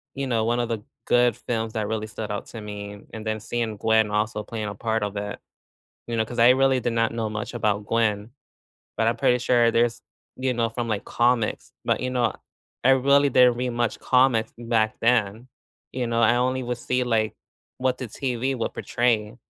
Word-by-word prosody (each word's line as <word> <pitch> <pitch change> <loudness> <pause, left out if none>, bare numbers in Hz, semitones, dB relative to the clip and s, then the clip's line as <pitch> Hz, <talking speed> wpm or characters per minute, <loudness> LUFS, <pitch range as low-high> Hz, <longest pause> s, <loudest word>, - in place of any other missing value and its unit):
you 140 0 -2
know, 115 -4 0
one 120 +1 +1
of 120 - 0
the 115 -2 -3 0.2
good 120 -2 +3
films 115 -2 -3
that 110 -2 -2
really 110 -1 -3
stood 110 0 -6
out 105 - -4
to 115 - -8
me, 105 -1 -7
and 110 -1 -6
then 110 0 -1
seeing 115 -1 -3
Gwen 110 0 +3
also 105 +1 -1
playing 110 0 -5
a 105 - -4
part 110 +1 -1
of 105 0 -3
it, 105 0 -4 0.7
you 115 -1 -3
know, 110 - +1
'cause 120 +2 -8
I 120 +2 +7
really 130 0 +4
did 120 - -1
not 115 -1 +1
know 115 -2 -2
much 110 +2 -5
about 105 -3 0
Gwen, 110 -2 0 0.7
but 110 - +2
I'm 115 - +2
pretty 125 - +3
sure 120 -1 +3
there's 115 0 +1 0.4
you 130 0 0
know, 115 -1 +1
from 115 +1 -4
like 105 -2 -2
comics, 120 -2 0
but - - +1
you 130 - -1
know, 125 -2 +1 0.5
I 125 - +5
really 140 +2 +4
didn't 125 -1 +5
read 125 0 -1
much 120 -2 -1
comics 125 -3 +3
back 115 -2 0
then, 115 0 +1 0.5
you 125 -1 -2
know, 115 0 0
I 115 +1 +5
only 130 +1 0
would 120 0 -3
see, 125 +1 0
like, 110 -3 0 0.4
what 130 0 0
the 130 - -4
TV 130 +2 -2
would 115 - -3
portray. 115 -1 0
115 Hz, 205 wpm, -24 LUFS, 110-125 Hz, 0.7 s, I